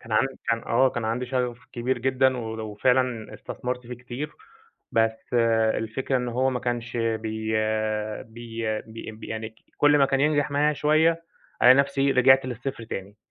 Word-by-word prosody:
كان 110 - -9
عند 120 +5 +3 0.4
آه، 130 +3 +4
كان 120 -2 -4
عندي 120 +3 -1
شغف 125 -2 -1
كبير 125 +1 -1
جدًا 130 +1 +2
ول 110 -2 -5
وفعلًا 115 +2 0
استثمرت 125 -1 -5
فيه 125 - -6
كتير، 125 +4 -6 0.6
بس 110 0 +2 0.6
الفكرة 130 +4 -2
إن 125 -1 -2
هو 130 +3 +1
ما 125 -1 -2
كانش 120 -1 -3
بي 110 -1 -2 0.7
بي 115 -1 -4
بي 110 0 -9
يعني 110 0 -5 0.2
كل 145 0 +5
ما 135 - +5
كان 135 0 0
ينجح 150 0 +2
معايا 150 +2 +2
شوية، 160 +3 +2 0.4
ألاقي 125 +1 +9
نفْسي 140 0 +2
رِجْعت 130 +1 +5
للصفر 125 -1 -5
تاني 100 -1 -7
125 Hz, 155 wpm, -25 LUFS, 115-135 Hz, 0.7 s, ألاقي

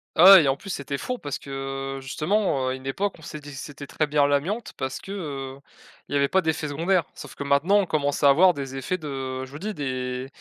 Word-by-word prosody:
Ah 165 - +5
ouais 185 -5 +9
et - - +2
en 135 0 +2
plus 195 - -8
c'était 140 -2 -3
fourbe 250 - -4
parce 145 -2 -3
que, 135 0 -5
heu, 135 - -8
justement, 150 0 0
heu, - - 0
à - - -1
une 130 +1 -8
époque 195 +9 -1
on - - -15
s'est 155 0 -7
dit 145 -1 -11
c'était 145 +1 -8
très 155 +2 -1
bien 145 -1 +3
l'amiante, 155 +11 -1
parce 130 -1 -4
que, 195 - -10
heu, 140 -8 -5 0.5
il 145 - -3
y - - +4
avait 140 0 +3
pas 190 +4 +2
d'effets 160 -2 -1
secondaires. 170 +4 +1
Sauf - - -10
que - - -5
maintenant 140 +9 +3
on 200 - +3
commence 145 -2 -1
à 140 - +8
avoir 175 +5 +6
des 135 -1 -5
effets 185 +8 -2
de 135 -4 -5
je 130 - -15
vous 145 - -8
dis 210 +3 -4
des 130 -2 -3
145 Hz, 260 wpm, -25 LUFS, 135-170 Hz, 0.5 s, ouais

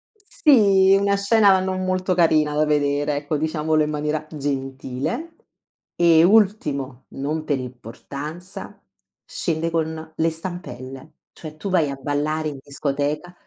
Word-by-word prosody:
Sì, 205 - +4
una 200 0 +2
scena 200 -1 +4
non 185 0 -2
molto 185 0 0
carina 155 -4 +3
da 155 - +3
vedere, 145 0 +1
ecco, 145 +1 -2
diciamolo 155 0 +1
in 150 - -2
maniera 150 +1 -2
gentile. 140 - -4 0.6
E 165 -1 +5
ultimo, 155 - +2
non 150 +3 -3
per 145 -3 -1
importanza, 140 - -8 0.4
scende 165 -1 -2
con 160 -1 -3
le 165 +1 +1
stampelle. 155 -5 -8 0.2
Cioè 155 -2 -10
tu 195 +5 -5
vai 165 -6 +2
a 140 - -4
ballare 150 +3 -2
in 140 - -8
discoteca 145 +4 -3
155 Hz, 130 wpm, -22 LUFS, 145-185 Hz, 0.6 s, E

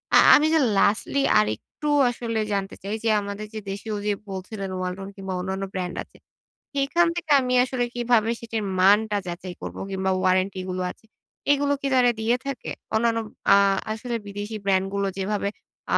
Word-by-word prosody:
আ - - +10 0.2
আমি 300 - +4
যে 320 - +5 0.2
লাস্টলি 215 +7 +2 0.2
আরেকটু 110 - -3 0.2
আসলে 230 -2 -3
জানতে 195 0 -2
চাই 200 +2 -2
যে 225 - +2
আমাদের 200 +1 -5
যে 220 - -4
দেশীয় 205 +2 -5
যে 210 - +3 0.2
বলছিলেন 195 +1 -5
ওয়ালটন 185 +1 -4
কিংবা 190 -1 -5
অন্যান্য 190 +2 -3
ব্র্যান্ড 180 -1 -3
আছে - - -22 0.6
সেখান 285 +5 +2
থেকে 335 -3 -4
আমি 250 -1 -1
আসলে 255 -1 -1
কিভাবে 240 -2 +2
সেটির 225 -2 -4 0.2
মানটা 205 +3 +4
যাচাই 180 +1 -6
করবো? - - -6
কিংবা 190 0 0
ওয়ারেন্টি 185 +1 +2
এগুলো 185 0 -3
আছে। - - -19 0.5
এগুলো 285 0 +2
কি 275 - -1
তারা 245 -1 +5
দিয়ে 230 +2 +2
থাকে? 275 -3 -5 0.3
অন্যান্য 230 +1 +2 0.3
আ - - +8 0.4
আসলে 235 +2 -3
বিদেশি 205 +2 -5
ব্র্যান্ড 190 -1 +2
গুলো 200 0 0
যেভাবে 200 +1 -1 0.5
আ - - +6
205 Hz, 170 wpm, -24 LUFS, 190-240 Hz, 0.6 s, আ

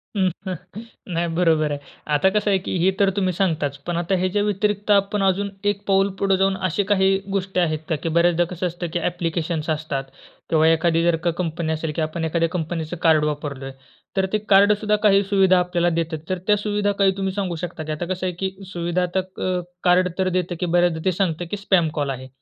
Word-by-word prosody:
नाही. 185 -1 -4
बरोबर 160 -3 +2
आहे. 145 - -3 0.3
आता 150 +6 +4
कसं 210 +1 0
आहे, 195 - +4
की 185 - -4
हे 190 - +4
तर 200 - +4
तुम्ही 185 -3 +1
सांगताच, 160 -6 0
पण 175 - -1
आता 175 +3 0
ह्याच्या 185 +3 0
व्यतिरिक्त 210 0 0
आपण 200 0 +2
अजून 195 +1 +1 0.2
एक 200 -1 -8
पाऊल 195 0 +3
पुढे 195 -1 +2
जाऊन, 195 0 +2
अशी 195 +4 0
काही 195 -1 +3
गोष्टी 190 -1 -1
आहेत 155 -3 +1
का? 160 - +2
की 160 +3 -3
बऱ्याचदा 170 +1 +3
कसं 180 0 -2
असतं, 175 0 -5
की 175 - 0
ॲप्लिकेशन्स 165 -2 -2
असतात 155 -3 -2 0.5
किंवा 160 -1 +4
एखादी 165 0 +3
जर 170 -1 +3
का 175 - +2
कंपनी 165 -2 -2
असेल, 160 0 -3
की - - -1
आपण 155 +1 -2
एखाद्या 165 +1 +1
कंपनीचं 165 -1 -3
कार्ड 160 -2 +4
वापरलं 145 -2 -4
आहे. 135 - -7 0.4
तर 190 - +3
ते 215 - +4
कार्डसुद्धा 210 +2 +4
काही 200 -1 +5
सुविधा 190 -2 +4
आपल्याला 175 -1 +1
देतात. 165 -1 -1
तर 185 - 0
त्या 210 -1 +4
सुविधा 205 0 0
काही 195 -1 +5
तुम्ही 195 -1 -1
सांगू 190 -3 -2
शकता? 170 -1 -5
की 155 - -5
आता 155 +3 -3
कसं 185 0 -5
आहे, 180 - -2
की 190 -1 -1 0.2
सुविधा 175 +1 0
तर - - +4 0.2
अ, 185 -1 0 0.2
कार्ड 180 0 +4
तर 190 -1 +1
देत, 180 -1 -1
की 180 - 0
बऱ्याचदा 175 -1 +2
ते 185 - +3
सांगत, 175 -2 -1
की 205 - -2
स्पॅम 190 -5 +2
कॉल 145 -2 -1
आहे. 130 -1 -5
180 Hz, 210 wpm, -22 LUFS, 165-195 Hz, 0.5 s, काही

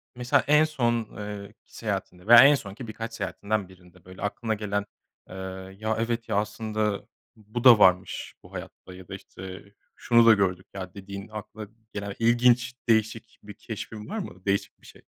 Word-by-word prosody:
mesela, 125 0 +2
en 150 +1 +6
son 120 -7 -1
eee, 105 -1 -6 0.2
ki - - -20
seyahatinde 90 +2 -4
veya 120 +1 +10
en 145 +2 +7
son 100 -7 -7
ki 115 +2 -9
birkaç 115 +1 -6
seyahatinden 100 0 -2
birinde, 90 -1 -19
böyle, 95 0 -12
aklına 110 +2 -2
gelen, 100 -1 -2 0.4
eee, 95 - -9 0.4
“Ya, 110 0 -1
evet 115 0 -2
ya, 110 - 0
aslında, 105 0 -1 0.3
bu 110 +2 -6
da 120 -4 +9
varmış 95 -1 +3
bu - - -16
hayatta." 95 - -9
ya 90 -1 -12
da - - -6
işte, 95 -1 -10 0.3
"Şunu 115 -1 +4
da 115 - +9
gördük 95 -2 0
ya.” 95 -2 -7
dediğin, 100 0 -8
aklına 110 0 -8 0.3
gelen 100 -1 -5
ilginç, 120 +1 +3 0.2
değişik 110 0 0
bir 105 0 -10
keşfin 110 0 -8
var 220 - -4
mı, 95 - -8
değişik 100 0 -1
bir - - -20
şey? - - -15
105 Hz, 180 wpm, -26 LUFS, 100-115 Hz, 0.4 s, veya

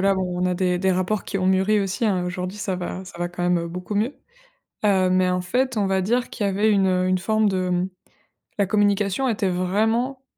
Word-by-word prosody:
là, 195 +1 +3
bon 190 - -1 0.2
on - - +2
a 180 - 0
des 180 0 0
des 190 +1 +2
rapports 185 +3 -1
qui 195 - -3
ont 185 - 0
mûri 190 +3 +3
aussi, 195 +4 -2
hein. 185 -4 +1
Aujourd'hui, 180 +2 -4
ça 195 -3 -2
va 180 +1 -5
ça 180 - -12
va 175 0 -1
quand 175 0 -6
même, 180 0 +2
heu, 170 0 -4
beaucoup 180 +4 -6
mieux. 220 +7 0 0.7
Heu 190 -3 +3
mais 185 0 +3
en 180 0 0
fait, 250 +6 -1
on 200 -2 +1
va 190 0 +1
dire 240 +6 0
qu'il 205 - -3
y - - +2
avait 205 +3 +2
une, 195 -2 +3
heu, 185 0 +1
une 185 0 +2
forme 215 +3 +1
de 185 -1 -1
mmh, 180 +1 0 0.7
la 200 - +4
communication 205 +4 +1
était 210 -5 0
vraiment 220 +9 0
190 Hz, 245 wpm, -23 LUFS, 180-210 Hz, 0.7 s, la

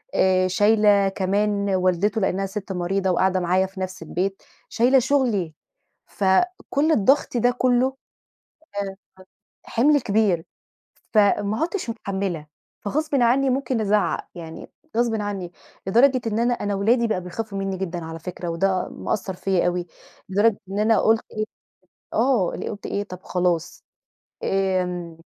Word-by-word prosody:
آآ 185 0 +3
شايلة 205 +1 +4
كمان 200 +1 0
والدته 185 +4 +1
لإنها 190 0 0
سِت 195 0 -6
مريضة 190 +1 -1
وقاعدة 185 +1 +2
معايا 185 +1 +2
في 190 0 -10
نفس 185 -2 -5
البيت، 190 +4 -3 0.3
شايلة 250 +4 +4
شُغلي، 240 - +1 0.5
فكلّ 285 - +1
الضغط 265 +1 +3
ده 245 +1 +3
كلّه 255 +1 +2 0.9
آآ، 195 -1 -5 0.7
حِمل 290 +5 +3
كبير، 200 -6 +1 0.7
فما 210 0 +3
عُدتش 335 - -2
متحمّلة، 195 -8 -3 0.3
فغصبٍ 300 +8 -2
عني 265 +2 +3
ممكن 255 -2 0
أزعّق، 210 0 +1
يعني 165 -2 -9 0.3
غصبٍ 230 -2 +1
عني، 195 -4 -4 0.4
لدرجة 255 +6 +4
إن 220 0 -1
أنا، 240 +1 +2
أنا 205 -4 -2
ولادي 230 +4 +2
بقوا 215 -4 0
بيخافوا 195 +3 -5
منّي 195 -1 -2
جدًا 175 -3 -4
على 165 0 -7
فكرة 175 +1 -6
وده 185 +2 0
مأثّر 200 -3 -3
فيَّ 185 -1 0
أوي 175 0 -1 0.4
لدرجة 205 +3 +3
إن 200 - -2
أنا 220 +1 +4
قُلت 225 0 +3
إيه، 215 0 -2 0.7
آه، 235 -7 +2
اللي - - -4
قُلت 205 - -7
إيه، 200 - -2
طَب 185 -2 -10
خلاص، 175 -2 -1 0.6
آمم، 180 -3 -1
200 Hz, 135 wpm, -23 LUFS, 185-230 Hz, 0.9 s, شايلة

